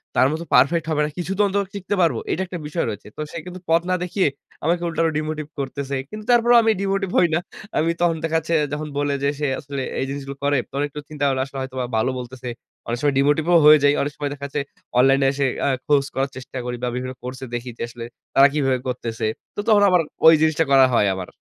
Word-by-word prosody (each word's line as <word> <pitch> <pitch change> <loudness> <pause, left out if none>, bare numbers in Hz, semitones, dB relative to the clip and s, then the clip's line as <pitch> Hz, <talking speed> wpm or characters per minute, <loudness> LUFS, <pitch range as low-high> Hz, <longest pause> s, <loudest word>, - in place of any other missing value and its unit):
তার 130 - +5
মতো 160 +2 -3
পারফেক্ট 150 +6 +4
হবে 150 -1 +1
না, - - -3
কিছু 175 +1 -3
তো - - +3
অন্তত 200 0 0
শিখতে 200 +1 -2
পারবো। 165 -2 +2
এইটা 185 - -1
একটা 180 - -5
বিষয় 160 +3 -1
রয়েছে। 105 -1 -7
তো - - -4
সে - - -6
কিন্তু 180 0 -8
পথ 165 +1 +4
না 185 - +3
দেখিয়ে 180 0 +1 0.4
আমাকে 170 +3 +1
উল্টা 165 0 -1
আরো 165 - +2
ডিমোটিভ 155 0 -3
করতেছে। 140 0 -3
কিন্তু 215 0 -8
তারপরেও 240 0 +5
আমি 225 - +4
ডিমোটিভ 195 -1 -1
হই 175 - +5
না। - - +2 0.4
আমি 165 - +2
তখন 170 -1 +3
দেখা 165 0 +1
যাচ্ছে 160 +1 -4 0.2
যখন 150 +1 -3
বলে 145 0 0
যে 140 - +3
সে 150 - 0
আসলে 140 -1 -5 0.2
এই - - 0
জিনিসগুলো 140 0 -6
করে, 145 0 +2
তখন 140 +1 -1
একটু 145 +1 -8
চিন্তা 150 -2 -5
করলে 130 -1 0
আসলে 135 0 -10
হয়তোবা 130 -1 -4
ভালো 110 +4 +1
বলতেছে। 125 0 -7 0.4
অনেক 120 - -1
সময় 145 -2 +1
ডিমোটিভ 145 +3 +2
ও - - +7
হয়ে 150 0 +9
যাই। 145 0 +5
অনেক 145 - -1
সময় 145 -1 -2
দেখা 140 -1 -7
যাচ্ছে 145 +1 -2 0.4
অনলাইনে 135 +1 +4
এসে 140 0 0 0.2
আ - - +2 0.2
খোঁজ 145 -2 +4
করার 135 +1 -1
চেষ্টা 130 0 -8
করি 125 0 -3
বা, - - +1
বিভিন্ন 130 +1 -4
কোর্সে 130 +1 -6
দেখি 120 +1 -5
যে, - - -9
আসলে 115 0 -8 0.3
তারা 135 +1 +8
কিভাবে 135 -4 +1
করতেছে। 120 -3 -3 0.3
তো - - -6
তখন 210 -2 +5
আবার 180 -2 +4 0.3
ওই 160 - +10
জিনিসটা 160 0 +2
করা 135 -1 +7
হয় 105 - +4
আমার। 95 -1 -6
145 Hz, 240 wpm, -22 LUFS, 135-165 Hz, 0.4 s, ওই